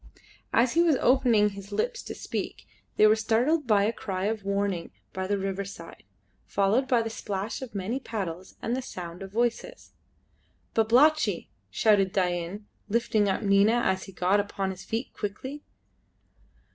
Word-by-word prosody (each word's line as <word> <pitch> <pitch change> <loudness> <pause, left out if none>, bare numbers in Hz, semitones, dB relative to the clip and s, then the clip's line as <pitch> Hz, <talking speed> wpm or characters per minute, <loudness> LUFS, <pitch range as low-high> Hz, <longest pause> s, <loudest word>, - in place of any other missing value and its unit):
As 235 +1 +3
he 335 - +4
was 335 -4 +4
opening 240 -5 +4
his 200 0 -10
lips 480 - -1
to - - -7
speak - - -5 0.3
they 215 - +6
were 215 0 +6
startled 240 +7 +1
by 205 -3 +4
a 220 +3 +1
cry 190 -4 -3
of 215 -1 -1
warning 200 -3 -1 0.2
by 190 0 -3
the 205 +1 +1
riverside, 195 -3 -5 0.5
followed 205 +7 +2
by 240 -3 +3
the 225 - -3
splash 205 +1 -4
of 250 -5 -8
many 205 +7 -2
paddles 185 -7 -5
and 235 - 0
the 260 - -2
sound 175 -7 -8
of 195 0 -7
voices. 240 - -2 0.8
"Babalatchi!" 235 - +3 0.2
shouted 195 - +3
Dain, 180 +2 -1 0.2
lifting 215 -2 +2
up 190 - -1
Nina 200 +4 +4
as 190 0 0
he 195 - -11
got 185 +2 +2
upon 200 -1 -2
his 190 0 -9
feet 230 +3 -4
quickly. 260 +8 -5
205 Hz, 160 wpm, -27 LUFS, 195-235 Hz, 0.8 s, they